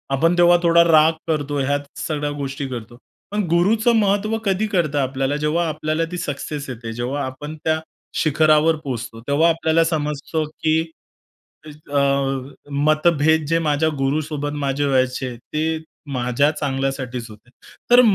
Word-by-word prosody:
आपण 165 +5 +2
तेव्हा 175 0 +6
थोडा 170 0 +6
राग 160 -1 +5
करतो 145 -2 -1
ह्या 140 +1 +1 0.3
सगळ्या 150 -2 -2
गोष्टी 140 0 -4
करतो. 120 -1 -7 0.3
पण 210 +1 0
गुरुचं 215 +8 +3
महत्त्व 205 +2 +1
कधी 195 +2 +1
कळतं 170 -8 0
आपल्याला 135 +1 -1
जेव्हा 155 +3 0
आपल्याला 155 +1 -1
ती 180 - -4
सक्सेस 145 -2 -4
येते. 115 -2 -6
जेव्हा 125 +5 -2
आपण 145 +4 -7
त्या 160 0 +2 0.4
शिखरावर 155 +1 +4
पोहोचतो 115 -4 -5
तेव्हा 150 +4 +4
आपल्याला 165 0 +2
समजतं 155 -1 -2 0.2
की 160 0 +3 1.1
अ, 140 - +3 0.8
मतभेद 155 0 +3
जे 165 +2 +2
माझ्या 155 0 +1
गुरूसोबत 145 +1 -1
माझे 140 +1 0
व्हायचे 130 -2 0
ते 155 +6 -2 0.4
माझ्या 125 +3 +2
चांगल्यासाठीच 135 -4 -3
होते. 110 +3 -15 0.4
तर 245 +1 +9
150 Hz, 135 wpm, -21 LUFS, 135-165 Hz, 1.1 s, तर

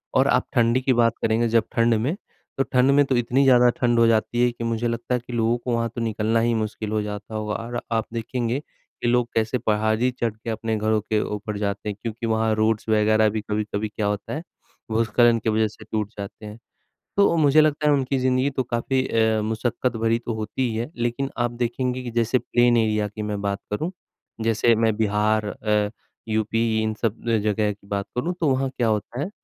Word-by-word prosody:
और - - +4
आप - - +2
ठंडी 120 +2 +3
की 130 0 +2
बात 115 -1 +3
करेंगे 115 +1 +2
जब 115 0 +3
ठंड 115 -1 +4
में, 125 +10 0 0.4
तो 135 - +3
ठंड 130 +1 +3
में 145 +1 +5
तो 135 - 0
इतनी 125 +3 +2
ज़्यादा 125 -2 +6
ठंड 120 -1 +3
हो 115 - +5
जाती 115 +2 +1
है 125 - +3
कि 120 0 -7
मुझे 115 0 -1
लगता 115 +2 -2
है 125 - -1
कि 125 - -7
लोगों 115 +1 +1
को 120 0 -3
वहाँ 115 0 0
तो 120 - -3
निकलना 110 0 0
ही 115 +1 +2
मुश्किल 110 -1 -3
हो 110 0 +1
जाता 105 +1 -6
होगा। 105 -1 -2
और 120 +1 -4
आप 115 -1 +1
देखेंगे 120 +2 -2
कि 125 - -9
लोग 120 0 +2
कैसे 115 +3 +1
पहाड़ी 110 +2 +1
चढ़ 120 -3 -2
के 110 +1 -8
अपने 110 0 -2
घरों 110 0 +1
के 110 +1 0
ऊपर 105 0 -4
जाते 100 0 -2
हैं 100 - -4
क्योंकि 115 0 -4
वहाँ 110 0 +1
रोड्स 110 0 0
वग़ैरह 110 0 +4
भी 110 +1 -3
कभी-कभी 105 0 -2
क्या 105 0 -3
होता 105 0 -3
है 150 - -3 0.5
भूस्खलन 115 +1 +3
की 110 - -1
वज़ह 110 0 +2
से 105 - -13
टूट 105 -2 -1
जाते 100 +1 -8
हैं। 105 +1 -8 0.6
तो 200 -4 +4
मुझे 155 0 +5
लगता 150 0 +1
है 145 - +5
उनकी 135 -1 0
ज़िंदगी 130 +2 +2
तो 130 -1 -2
काफ़ी 130 +2 -1
अ, 110 -1 +2
मशक्कत 115 +3 -1
भरी 115 +1 +1
तो 115 -1 -4
होती 110 +3 -2
ही 110 - -4
है। 120 +6 -3
लेकिन 120 +3 -1
आप 120 0 0
देखेंगे 125 +1 -2
कि 120 - -5
जैसे 115 +2 +2
प्लेन 120 -1 +2
एरिया 110 -2 +1
की 105 +1 -8
मैं 105 -1 -3
बात 100 -1 -2
करूँ, 155 - -2 0.5
जैसे 115 +1 +3
मैं 110 -1 +2
बिहार 105 0 +1
अ, 105 0 0 0.4
यूपी 110 +1 +1
इन 110 0 -1
सब 115 -2 -1 0.2
जगह 105 0 +1
की 100 0 -13
बात 100 -1 -2
करूँ 165 +9 -1
तो 160 - +1
वहाँ 135 0 +1
क्या 120 -2 +1
होता 110 +3 -2
है 175 - -2
115 Hz, 220 wpm, -23 LUFS, 110-120 Hz, 0.6 s, ज़्यादा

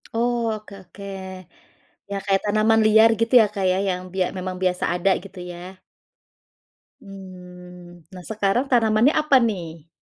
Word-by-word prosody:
Oh, 235 -1 0
oke 215 -1 -10
oke. 200 - -14 1.1
Ya 200 - -2
kayak 195 -1 +1
tanaman 215 +2 +2
liar 220 +1 +6
gitu 230 +3 0
ya, - - +4
Kak, 195 -2 -2
ya, 185 - 0
yang 180 0 -2
bia 185 -1 0
memang 185 0 -5
biasa 180 -1 0
ada 190 +2 +1
gitu 195 -1 -12
ya? 180 +2 -11 1.2
Mmm, 180 -3 -13
nah 180 -1 -10
sekarang 215 +4 0
tanamannya 230 +2 +3
apa 300 -3 +2
nih? 170 -8 -4
195 Hz, 145 wpm, -22 LUFS, 180-220 Hz, 1.2 s, liar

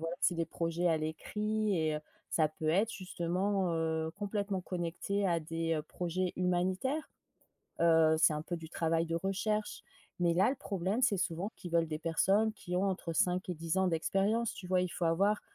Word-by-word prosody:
voilà 165 +1 -3
c'est 175 - +3
des 165 0 0
projets 170 +1 -1
à 165 - +3
l'écrit 210 +7 -1
et 155 -1 +1
heu, 150 - -3 0.3
ça 155 -2 +3
peut 155 0 -4
être 205 +7 +2
justement, 185 +1 -1
heu, 160 -1 0
complètement 200 -1 -2
connecté 180 +3 -2
à 170 -3 +2
des, 165 +1 -2
heu, 155 - -1
projets 180 +3 -2
humanitaires. 185 - 0 0.7
Heu, 160 -1 +5
c'est 155 0 +5
un 150 - -2
peu 175 +2 -4
du 160 -1 -9
travail 165 0 +1
de 165 - -4
recherche. 200 +4 -1 0.4
Mais 175 -1 +3
là, 185 +7 +4
le 275 - -1
problème 200 -1 -1
c'est 215 -5 +3
souvent 190 +1 -2
qu'ils 175 - -8
veulent 165 -1 +3
des 155 0 -4
personnes 195 +6 +2
qui 180 -4 -5
ont 185 +2 +2
entre 180 -3 -2
5 180 +3 +1
et - - 0
10 165 +2 -2
ans 190 - +3
d'expérience, 195 +7 +1
tu 195 - -9
vois? 180 0 +2
Il 180 - -1
faut 170 - -2
avoir 200 +6 +2
180 Hz, 195 wpm, -33 LUFS, 165-195 Hz, 0.7 s, Heu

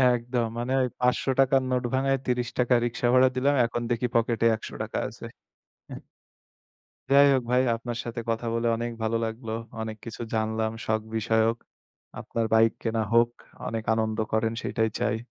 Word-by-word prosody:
একদম 120 0 -1
মানে 120 +2 -3
ওই 125 - +2
৫০০ 125 +2 +1
টাকার 135 0 +4
নোট 125 0 +1
ভাঙ্গায় 135 +1 +2
৩০ 125 -1 0
টাকা 125 0 +4
রিকশা 120 0 -1
ভাড়া 130 0 +6
দিলাম। 140 +3 +2
এখন 120 +1 -3
দেখি 120 +1 +1
পকেটে 115 0 +2
১০০ 110 - -9
টাকা - - -5
আছে। - - -10 0.6
হ্যাঁ। - - -8 1.1
যাই 140 +1 +8
হোক 130 -2 +1
ভাই 125 - +4
আপনার 115 0 -5
সাথে 120 0 -5
কথা 115 +1 -1
বলে 115 0 0
অনেক 120 +1 -3
ভালো 115 +1 +1
লাগলো। 110 0 -5 0.3
অনেক 110 -1 -5
কিছু 115 0 -7
জানলাম 110 0 0
শখ 110 0 0
বিষয়ক। 110 +1 +2 0.6
আপনার 115 -1 -2
বাইক 110 0 +5
কেনা 115 -1 0
হোক, 115 0 +5 0.4
অনেক 115 -1 -3
আনন্দ 110 0 -1
করেন 110 +1 +1
সেটাই 110 0 0
চাই। 105 +1 0
115 Hz, 170 wpm, -26 LUFS, 110-125 Hz, 1.1 s, যাই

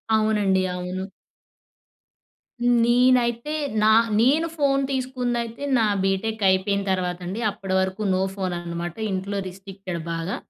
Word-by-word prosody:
అవునండి. 210 -3 +2
అవును. 180 +1 -4 1.8
నేనైతే, 245 +2 +3 0.3
నా 220 - +6 0.3
నేను 300 +7 +3
ఫోన్ 275 -2 +2
తీసుకుందైతే 250 -2 -2
నా 225 - +3 0.2
బీటెక్ 205 +3 -1
అయిపోయిన 200 +2 +1
తర్వాత 180 -1 -1
అండి. 190 +5 -4
అప్పటి 195 -2 -5
వరకు 190 +2 -2
నో 185 - +1
ఫోన్ 185 -2 -2
అనమాట. 170 0 -5 0.2
ఇంట్లో 195 +1 -3
రిస్ట్రిక్టెడ్ 190 -1 -7
బాగా. 165 +3 -3
200 Hz, 115 wpm, -24 LUFS, 185-235 Hz, 1.8 s, నా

